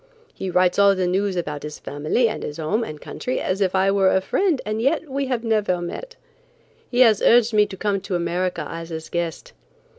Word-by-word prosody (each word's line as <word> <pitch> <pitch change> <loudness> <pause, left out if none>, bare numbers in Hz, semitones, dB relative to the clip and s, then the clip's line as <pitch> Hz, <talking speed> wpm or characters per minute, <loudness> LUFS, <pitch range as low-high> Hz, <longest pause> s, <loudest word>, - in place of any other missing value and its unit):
He 190 - -5
writes 180 +1 +2
all 200 -1 +6
the 185 -1 0
news 190 +2 0
about 150 -4 -3
his 150 0 -7
family 155 - 0
and 220 - -4
home 185 +9 -1
and 155 -8 -7
country 255 - -4
as 190 +2 -2
if 190 -1 +1
I 190 +1 +3
were 195 -1 +3
a 190 - +3
friend 325 - 0
and 215 +1 -2
yet 295 +5 +1
we 275 0 -2
have 245 -3 -2
never 210 -5 +1
met. - - -6 0.7
He 245 0 +2
has 220 -5 +5
urged 235 -1 +5
me 210 -1 +4
to 190 - -9
come 200 -1 -1
to 195 -1 -3
America 175 +1 -1
as 165 0 -7
his 160 -1 -6
guest. 170 -3 -4
195 Hz, 210 wpm, -22 LUFS, 175-225 Hz, 0.7 s, all